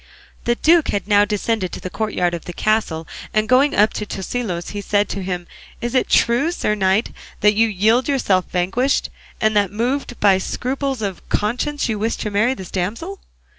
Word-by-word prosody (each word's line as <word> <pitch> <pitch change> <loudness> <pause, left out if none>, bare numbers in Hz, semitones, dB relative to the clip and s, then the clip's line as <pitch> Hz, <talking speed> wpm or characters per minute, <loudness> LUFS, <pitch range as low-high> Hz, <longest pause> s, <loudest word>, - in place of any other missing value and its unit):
'" - - -29
The 240 - +2
duke 325 +4 +4
had 200 0 -2
now 205 -1 +5
descended 210 -2 -1
to - - -5
the 185 - -6
courtyard 180 -5 -1
of 170 - -5
the 175 - -6
castle, 175 -7 0 0.3
and 215 0 +2
going 270 +4 +4
up 210 +2 +4
to 210 - -3
Tosilos 190 -3 -4
he 205 - -4
said 205 0 +1
to 200 - -3
him, 180 -1 -3 0.3
"Is 240 0 -3
it 255 - +2
true, 245 +8 +3
sir 210 - 0
knight, 195 +2 +1 0.3
that 210 0 +5
you 225 +2 +3
yield 220 +5 +2
yourself 205 -10 +1
vanquished, 190 +10 0 0.3
and 215 0 +2
that 200 -2 +2
moved 245 +3 -2
by 195 -2 +4
scruples 265 +3 -3
of 195 -3 -5
conscience 250 +7 -1
you 220 -3 -2
wish 225 +2 0
to 210 - -4
marry 215 +6 +2
this 190 -5 -9
damsel?" 230 - -3
215 Hz, 195 wpm, -20 LUFS, 195-245 Hz, 0.3 s, now